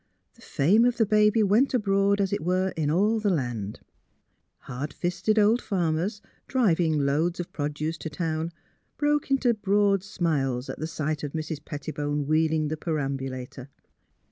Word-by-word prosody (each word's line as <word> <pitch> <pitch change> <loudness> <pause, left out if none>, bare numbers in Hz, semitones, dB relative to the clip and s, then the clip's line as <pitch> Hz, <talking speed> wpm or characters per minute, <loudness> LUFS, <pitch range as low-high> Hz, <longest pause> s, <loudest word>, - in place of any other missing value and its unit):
The - - -23
fame 195 +12 +3
of 245 0 +2
the 225 - +3
baby 210 +1 +4
went 225 +7 +3
abroad, 200 -2 +2
as 195 -1 0
it - - -1
were, 185 +3 0
in 155 -2 0
all 205 +8 +2
the 210 -1 +1
land. 120 - -2 0.8
Hard 135 +3 -6
fisted 180 +5 -1
old 215 +3 +4
farmers, 180 +2 -1 0.2
driving 175 - +2
loads 160 +6 0
of 175 - -5
produce 150 +2 -3
to 160 - -5
town, 160 +1 -2 0.5
broke 295 -1 +1
into 265 -3 +3
broad 200 -2 +2
smiles 140 -10 -1
at 155 - -5
sight 155 -1 -3
of 145 - -4
Mrs. 155 -1 -4
Petti 150 0 -6
bone 145 0 -2
wheeling 155 0 +1
the 155 - -3
perambulator. 135 -4 -4
165 Hz, 155 wpm, -26 LUFS, 150-205 Hz, 0.8 s, baby